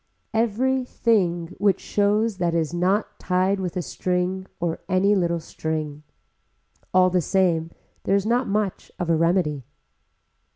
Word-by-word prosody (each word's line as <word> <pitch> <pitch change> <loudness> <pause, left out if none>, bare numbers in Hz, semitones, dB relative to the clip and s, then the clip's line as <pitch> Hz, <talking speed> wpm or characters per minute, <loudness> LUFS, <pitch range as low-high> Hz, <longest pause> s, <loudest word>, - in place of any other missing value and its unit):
Every 240 +4 +1
thing 180 -9 0
which 200 -2 +3
shows 210 +1 +1
that 170 -2 0
is 160 -1 0
not 185 +5 0
tied 185 +2 +1
with 185 -1 -3
a 180 - -1
string 180 +3 -2
or 170 -2 -2
any 190 +2 +3
little 170 -3 +1
string. 155 -2 -4 0.9
All 185 0 +4
the 180 0 +2
same 170 -3 +1 0.4
there 195 - +3
is 200 0 +1
not 240 +3 +1
much 205 -1 -2
of 175 -2 -1
a - - +4
remedy. 165 -4 +1
185 Hz, 140 wpm, -24 LUFS, 170-205 Hz, 0.9 s, All